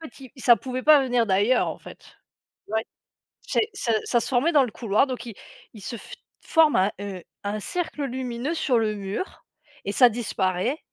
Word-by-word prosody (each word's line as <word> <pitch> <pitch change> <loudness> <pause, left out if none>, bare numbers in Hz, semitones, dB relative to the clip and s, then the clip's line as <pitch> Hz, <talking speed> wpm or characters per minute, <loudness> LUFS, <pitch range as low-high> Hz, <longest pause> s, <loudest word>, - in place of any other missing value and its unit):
en 320 - -7
fait, 245 - -19
il 260 - -12
ça 240 -2 +7
pouvait 255 0 -5
pas 305 -1 +7
venir 245 -3 +1
d'ailleurs, 205 +6 +2
en - - -6
fait. - - -13 0.6
Ouais. 220 +1 -1 0.6
C'est 430 - 0
ça 240 -12 -1
ça 240 - +2
se - - -4
formait 265 +5 +2
dans 285 -4 +5
le 230 - -6
couloir 220 +4 +1
donc 255 -3 -5
il 230 - -7 0.4
il 215 - -11
se 235 - -5 0.5
forme 320 -3 +4
un, 190 +2 +3
heu, 195 -3 -6 0.2
un 210 +1 -2
cercle 330 - -3
lumineux 255 +2 -3
sur 275 -7 +1
le 215 -1 0
mur 200 - -6 0.4
et 200 - -2
ça 250 +3 +7
disparaît 210 - -1
240 Hz, 190 wpm, -25 LUFS, 210-270 Hz, 0.6 s, ça